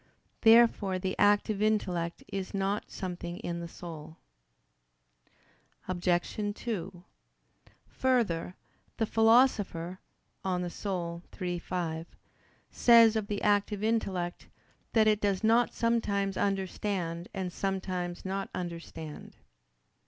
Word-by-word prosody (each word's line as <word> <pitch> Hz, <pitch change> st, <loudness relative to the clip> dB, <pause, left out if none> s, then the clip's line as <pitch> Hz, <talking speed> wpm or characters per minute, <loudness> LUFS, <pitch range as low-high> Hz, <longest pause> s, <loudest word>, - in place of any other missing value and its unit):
Therefore 225 Hz, -4 st, +5 dB
the 185 Hz, 0 st, -2 dB
active 205 Hz, 0 st, +3 dB
intellect 180 Hz, -6 st, 0 dB
is 195 Hz, -1 st, -4 dB
not 195 Hz, +1 st, -1 dB
something 175 Hz, -2 st, -5 dB
in 170 Hz, 0 st, -3 dB
the 170 Hz, -, -5 dB
soul. 160 Hz, -2 st, -9 dB, 1.7 s
Obj. 175 Hz, -1 st, 0 dB, 0.2 s
2: 185 Hz, -6 st, -5 dB, 0.8 s
Further, 215 Hz, -10 st, 0 dB, 0.4 s
the 225 Hz, -, +1 dB
Philosopher 220 Hz, -7 st, +3 dB, 0.4 s
(De 190 Hz, -, -3 dB
Anima 180 Hz, -1 st, -3 dB, 0.2 s
iii, 175 Hz, -1 st, -1 dB
5) 165 Hz, -2 st, -3 dB, 0.6 s
says 230 Hz, -2 st, +6 dB
of 215 Hz, -2 st, -1 dB
the 205 Hz, -1 st, -3 dB
active 205 Hz, 0 st, +2 dB
intellect, 190 Hz, -6 st, -1 dB, 0.5 s
"that 220 Hz, -2 st, +5 dB
it 215 Hz, -1 st, +3 dB
does 200 Hz, -1 st, 0 dB
not 230 Hz, +2 st, +4 dB
sometimes 205 Hz, -4 st, 0 dB
understand 190 Hz, -3 st, -2 dB
and 185 Hz, -3 st, -4 dB
sometimes 185 Hz, -2 st, -3 dB
not 195 Hz, +1 st, -3 dB
understand." 165 Hz, -3 st, -7 dB
190 Hz, 100 wpm, -30 LUFS, 175-210 Hz, 1.7 s, says